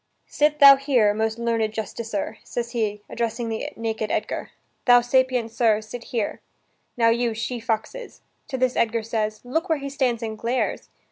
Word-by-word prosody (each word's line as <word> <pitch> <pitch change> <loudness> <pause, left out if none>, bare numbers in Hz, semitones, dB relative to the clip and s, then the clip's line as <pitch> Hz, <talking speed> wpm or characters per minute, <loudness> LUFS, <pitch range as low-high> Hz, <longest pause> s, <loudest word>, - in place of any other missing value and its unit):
"Sit 300 0 +1
thou 280 -2 +9
here, 255 -7 +3
most 220 +1 -1
learned 230 -2 0
justicer," 220 0 -4
says 235 -1 -4
he, 210 -3 -2
addressing 230 0 -3
the 220 0 -3
naked 220 -1 -3
Edgar; - - -2 0.4
"Thou, 245 -1 +7
sapient 250 -1 +1
sir, 225 -2 +3
sit 225 +2 -9
here. 230 -4 -3 0.6
Now, 230 -1 +4
you 235 0 +1
she 235 +2 -3
foxes." 230 - -4 0.3
To 275 -4 -4
this 255 -1 +1
Edgar 230 0 +1
says: 215 -1 -2
"Look 320 +9 -2
where 320 - +2
he 280 0 -5
stands 250 -4 0
and 220 -1 -5
glares! 245 +2 -2
230 Hz, 165 wpm, -24 LUFS, 220-255 Hz, 0.6 s, thou